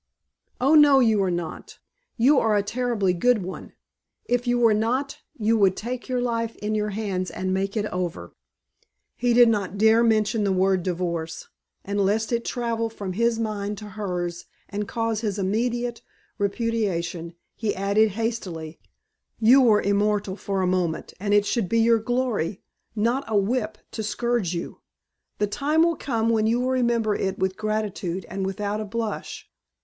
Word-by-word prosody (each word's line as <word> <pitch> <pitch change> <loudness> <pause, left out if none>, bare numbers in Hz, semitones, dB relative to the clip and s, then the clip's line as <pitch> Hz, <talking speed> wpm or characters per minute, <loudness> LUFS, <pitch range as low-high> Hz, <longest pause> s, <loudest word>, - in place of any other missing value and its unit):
"Oh, 270 +4 +3
no, 295 -3 +7
you 220 -5 +3
are 190 - +1
not. 175 -2 -5 0.4
You 265 +4 +5
are 220 -2 +2
a 200 - +1
terribly 220 -4 0
good 220 +3 +2
one. 185 - -8 0.5
If 245 0 0
you 245 0 +2
were 230 -2 +4
not 250 +6 -1 0.2
you 225 0 +2
would 190 -2 +3
take 250 +3 -5
your 250 -1 0
life 230 -2 -1
in 210 +1 -3
your 210 0 0
hands 195 -3 -2
and 185 0 -3
make 195 +3 -1
it 210 - 0
over." 180 -2 -4 0.8
He 245 0 +1
did 240 0 +8
not 205 -3 0
dare 220 +2 +5
mention 215 -1 +2
the 200 - +1
word 190 0 +2
divorce, 170 -2 -3 0.4
and 200 +1 -1
lest 215 +4 +1
it 235 -1 0
travel 230 -2 -2
from 200 -4 -6
his 235 +3 +1
mind 210 -2 -3
to 210 0 -8
hers 180 -4 -4 0.2
and 205 0 -4
cause 225 -2 -1
his 210 -3 -2
immediate 235 +4 -1 0.4
repudiation, 195 -6 -2 0.2
he 220 -3 -2
added 200 +3 +2
hastily: 190 -8 -4 0.6
"You 245 +5 +6
were 220 -4 +4
immortal 200 -1 +1
for 195 -2 -2
a - - +2
moment 180 -3 -1
and 205 +1 -2
it 205 0 +4
should 210 -4 -1
be 230 - +1
your 230 0 +4
glory, 220 -5 -1 0.3
not 235 +6 +1
a 215 - +1
whip 215 +1 0
to 220 - -4
scourge 215 -4 -1
you. 170 - -6 0.6
The 210 - +1
time 290 +10 +1
will 335 0 +2
come 230 -6 -1
when 220 -1 +2
you 235 +2 +2
will 255 +1 0
remember 235 -4 +1
it 195 -1 -2
with 190 0 -1
gratitude 210 -4 -3
and 195 0 -3
without 205 +2 -2
a - - -4
blush. 225 +1 -4
215 Hz, 170 wpm, -24 LUFS, 195-235 Hz, 0.8 s, did